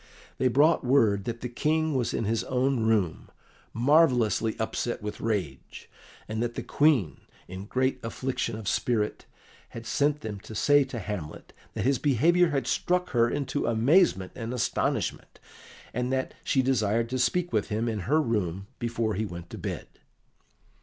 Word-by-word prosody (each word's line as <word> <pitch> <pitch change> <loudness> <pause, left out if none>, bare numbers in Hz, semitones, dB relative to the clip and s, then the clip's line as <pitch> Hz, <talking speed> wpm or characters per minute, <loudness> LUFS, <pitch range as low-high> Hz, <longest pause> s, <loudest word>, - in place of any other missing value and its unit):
They 130 - +3
brought 145 +7 +4
word 115 -7 +3
that 115 -1 -4
the 125 - -3
King 155 +5 0
was 125 -3 0
in - - -2
his 110 +1 0
own 130 0 +1
room, 100 -8 0 0.4
marvellously 120 -5 +3
upset 110 0 -2
with 105 - -5
rage, 100 -12 -4 0.4
and 110 +1 -3
that 120 0 -2
the - - -4
Queen, 140 - +2 0.3
in 95 +2 -7
great 130 +3 0
affliction 125 +1 -3
of 110 -3 -8
spirit, 110 -2 -1 0.4
had 115 0 -9
sent 145 +3 +1
them 105 -5 -5
to 110 - -10
say 145 +6 +4
to 130 -2 -7
Hamlet 100 -7 -6 0.2
that - - -2
his 135 0 +2
behaviour 165 +6 +3
had 135 -5 -1
struck 180 +8 0
her 120 -2 +3
into 145 +1 -2
amazement 115 - +3
and 115 +1 -5
astonishment, 125 - -2 0.5
and 125 +1 -1
that 130 0 -1
she 130 - +2
desired 115 -3 +1
to 130 +1 -2
speak 175 +7 +1
with 105 - 0
him 110 +3 -1
in 110 -2 -2
her 155 +2 +4
room 100 - -1
before 115 -2 -1
he 110 +2 -2
went 85 -2 -9
to - - -7
bed. - - -4
120 Hz, 165 wpm, -27 LUFS, 110-135 Hz, 0.5 s, brought